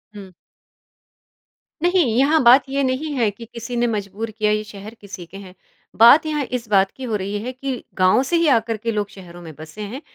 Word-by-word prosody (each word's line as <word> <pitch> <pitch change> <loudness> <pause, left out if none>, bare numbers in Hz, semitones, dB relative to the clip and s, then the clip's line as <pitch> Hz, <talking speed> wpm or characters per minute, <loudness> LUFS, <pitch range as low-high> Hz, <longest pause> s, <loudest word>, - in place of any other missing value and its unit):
हुँ। 195 -2 -11 1.5
नहीं, 355 +1 +3
यहाँ 295 +5 +3
बात 250 +3 +7
ये 275 +1 -1
नहीं 265 +4 -2
है 235 -6 +1
कि 230 +3 -12
किसी 235 +1 -8
ने 240 0 +1
मजबूर 215 0 -4
किया 215 0 0
ये 215 0 0
शहर 210 0 -11
किसी 200 -3 -9
के 185 +3 -12
हैं। 190 -2 -12 0.5
बात 255 +8 +7
यहाँ 300 -2 -2
इस 245 -2 -4
बात 195 -1 +3
की 265 - -11
हो 230 -4 -2
रही 200 +1 -3
है 250 - -4
कि 260 -1 -5
गाँव 185 +6 +4
से 305 +6 -1
ही 335 -1 +2
आकर 225 -3 +1
के 230 +2 -3
लोग 210 -2 -2
शहरों 175 -3 -13
में 165 -2 -10
बसे 155 +7 -11
हैं। 220 +7 -7
225 Hz, 215 wpm, -20 LUFS, 200-260 Hz, 1.5 s, बात